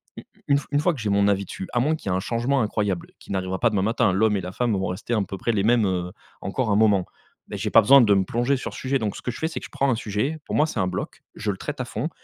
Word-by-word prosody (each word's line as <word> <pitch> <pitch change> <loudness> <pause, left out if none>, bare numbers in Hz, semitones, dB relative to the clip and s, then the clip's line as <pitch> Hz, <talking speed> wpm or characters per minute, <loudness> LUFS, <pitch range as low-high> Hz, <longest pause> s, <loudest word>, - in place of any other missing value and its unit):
Une - - -10 0.2
une 140 0 +4
f 140 - -12
une 145 - +2
fois 175 +4 +2
que 145 - -8
j'ai 105 - -1
mon 100 0 +3
avis 100 -1 +1
dessus, 95 - -7
à 120 - +2
moins 150 +6 +2
qu'il 150 - -6
y - - +1
ait - - +1
un - - 0
changement 120 +7 0
incroyable 105 -4 -2
qui - - -12
n'arrivera 95 -1 -2
pas 120 - +3
demain 100 -3 +1
matin, 110 0 +2
l'homme 105 +2 +2
et - - -2
la 90 - -6
femme 120 +4 0
vont 95 0 -1
rester 95 +6 -4
un 110 -3 +2
peu 95 +1 -6
près 115 - -1
les 100 -2 +1
mêmes, 115 0 +3
heu, 90 -1 -2 0.3
encore 110 +5 -2
un 100 - +3
moment, 105 -4 +4 0.4
mais - - -6
j'ai - - -3
pas - - +8
besoin 140 +7 +7
de 105 -4 +5
me 95 -1 +3
plonger 120 +7 +1
sur 130 - -6
ce - - -7
sujet, 135 +1 0
donc 105 -2 -2
ce - - -9
que 125 - -2
je - - -9
fais 160 - 0
c'est 160 - -5
que - - -9
je - - -13
prends 140 - +1
un 120 - +2
sujet, 110 +7 -2
pour - - -4
moi 155 - +3
c'est 125 - -4
un 95 - +2
bloc, 90 - -5
je 105 -1 -3
le 95 - -6
traite 145 +3 -5
à 125 - -3
fond, 150 +6 -3
110 Hz, 340 wpm, -24 LUFS, 95-125 Hz, 0.4 s, pas